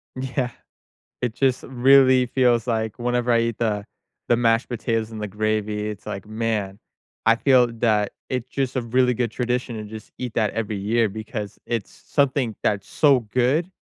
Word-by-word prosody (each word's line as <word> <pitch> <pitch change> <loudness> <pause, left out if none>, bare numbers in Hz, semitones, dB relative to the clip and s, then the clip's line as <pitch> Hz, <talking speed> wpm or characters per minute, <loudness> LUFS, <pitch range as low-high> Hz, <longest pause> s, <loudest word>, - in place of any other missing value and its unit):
Yeah. 130 -1 -2 0.7
It 120 -3 -1
just 130 -1 +1
really 130 0 +5
feels 120 -2 +2
like 110 -1 -1
whenever 120 0 0
I 115 - +4
eat 115 -1 -1
the 105 -3 -1 0.4
the 120 - +4
mashed 115 +1 +2
potatoes 115 -1 -2
and 110 -1 -7
the 105 - -2
gravy, 105 +1 -1
it's 105 -1 -7
like, 100 - -5
man, 110 -3 -2 0.5
I 115 - +6
feel 130 -1 +4
that 110 -3 +1 0.2
it's 125 -1 -3
just 135 -1 -2
a 130 - +1
really 125 +2 +2
good 120 0 -1
tradition 125 0 -2
and 105 -1 -6
just 110 0 -10
eat 125 -3 -5
that 110 -2 +1
every 110 -2 -3
year, 110 +2 +1
because 105 0 -6
it's 115 -4 -3
something 130 -5 0
that's 100 -1 0
so 140 -4 +4
good 125 - 0
115 Hz, 175 wpm, -23 LUFS, 110-125 Hz, 0.7 s, I